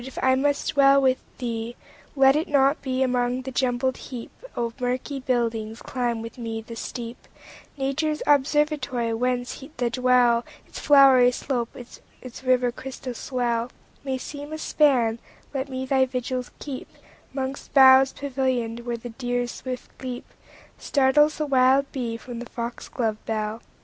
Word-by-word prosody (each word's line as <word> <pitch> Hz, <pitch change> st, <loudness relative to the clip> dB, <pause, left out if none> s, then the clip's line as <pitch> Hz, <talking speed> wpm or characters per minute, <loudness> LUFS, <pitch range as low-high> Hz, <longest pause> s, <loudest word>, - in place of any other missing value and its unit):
if 265 Hz, +1 st, -10 dB
I 260 Hz, 0 st, +5 dB
must 285 Hz, +2 st, 0 dB
with 275 Hz, -2 st, +5 dB, 0.2 s
thee 235 Hz, -1 st, -4 dB, 0.4 s
dwell, 270 Hz, -1 st, +4 dB
Let 270 Hz, -, +4 dB
it 310 Hz, +3 st, 0 dB
not 280 Hz, -1 st, +3 dB
be 260 Hz, -1 st, 0 dB
among 250 Hz, 0 st, 0 dB
the 265 Hz, -, -5 dB
jumbled 255 Hz, 0 st, 0 dB
heapOf 240 Hz, -, -6 dB
murky 255 Hz, +3 st, -2 dB
buildings; 230 Hz, -3 st, -1 dB
climb 240 Hz, -3 st, -2 dB
with 230 Hz, +2 st, -9 dB
me 225 Hz, -1 st, -4 dB
the 225 Hz, +1 st, -9 dB
steep,—Nature's 270 Hz, +5 st, -5 dB
observatory—whence 255 Hz, -4 st, +1 dB
the 240 Hz, -1 st, 0 dB
dell, 250 Hz, -1 st, +3 dB, 0.2 s
Its -, -, -9 dB
flowery 270 Hz, -3 st, +6 dB
slopes, 245 Hz, -1 st, -5 dB, 0.2 s
its 255 Hz, 0 st, -10 dB
river's 250 Hz, -1 st, +2 dB
crystal 260 Hz, -1 st, -6 dB
swell, 240 Hz, -1 st, -1 dB, 0.3 s
May 265 Hz, -2 st, -2 dB
seem 290 Hz, +3 st, -8 dB
a 315 Hz, -, -4 dB
span; 250 Hz, -8 st, +2 dB, 0.3 s
let 270 Hz, 0 st, -3 dB
me 260 Hz, 0 st, -4 dB
thy 265 Hz, 0 st, +3 dB
vigils 255 Hz, 0 st, -3 dB
keep'Mongst 270 Hz, -1 st, -7 dB
boughs 265 Hz, 0 st, +8 dB
pavillion'd, 255 Hz, -4 st, -2 dB
where 240 Hz, 0 st, -4 dB
the 240 Hz, +1 st, -8 dB
deer's 245 Hz, 0 st, -2 dB
swift 255 Hz, -1 st, -7 dB
leapStartles 265 Hz, +3 st, 0 dB
the 305 Hz, -, -1 dB
wild 270 Hz, 0 st, +3 dB
bee 235 Hz, -4 st, -3 dB
from 235 Hz, +1 st, -8 dB
the 240 Hz, -, -8 dB
fox 235 Hz, 0 st, -6 dB
glove 220 Hz, -4 st, -2 dB
bell. 215 Hz, 0 st, -2 dB
255 Hz, 140 wpm, -25 LUFS, 240-270 Hz, 0.4 s, boughs